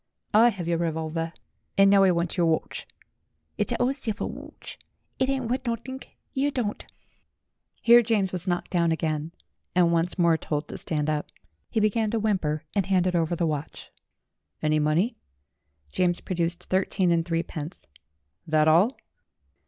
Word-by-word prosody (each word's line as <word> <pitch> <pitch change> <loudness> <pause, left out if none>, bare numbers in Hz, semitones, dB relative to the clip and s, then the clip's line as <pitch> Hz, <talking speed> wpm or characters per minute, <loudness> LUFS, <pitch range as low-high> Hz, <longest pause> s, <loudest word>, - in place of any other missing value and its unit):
"I 225 +3 +7
have 190 -6 -5
your 170 -1 +1
revolver, 165 0 -2 0.5
and 195 0 +6
now 200 -1 +6
I 190 - +6
want 170 -1 0
your 175 -2 +2
watch." 160 -1 -1 0.7
"It's - - +1
a - - -1
ole 255 +2 +2
silver 230 -7 -3
watch; - - -9 0.4
it 260 0 +2
ain't 265 -2 -1
wuth 255 +3 -1
nutthink; 240 +3 -5 0.2
yer 275 +2 +1
don't 245 -7 -3 0.5
" - - -42
Here 235 +1 +8
James 210 -5 +1
was 180 +1 -4
knocked 175 -1 -1
down 170 -2 +2
again, 155 -1 -1 0.4
and 175 -2 +4
once 170 +3 0
more 170 -2 +4
told 150 -1 -3
to - - -6
stand 150 -2 -2
up. 150 -1 -1 0.4
He - - 0
began 215 +1 +1
to 225 +1 0
whimper 175 -8 0
and 195 -3 0
handed 185 -2 +2
over 170 0 +1
the 170 - 0
watch. 150 -2 -4 0.7
"Any 155 0 +1
money?" 155 +10 +1 0.7
James 175 -1 +1
produced 170 -1 -2
thirteen 185 -1 +1
and 165 -1 +2
threepence. 165 -1 -4 0.6
"That 155 0 +3
all?" 180 +11 +4
175 Hz, 160 wpm, -26 LUFS, 165-215 Hz, 0.7 s, Here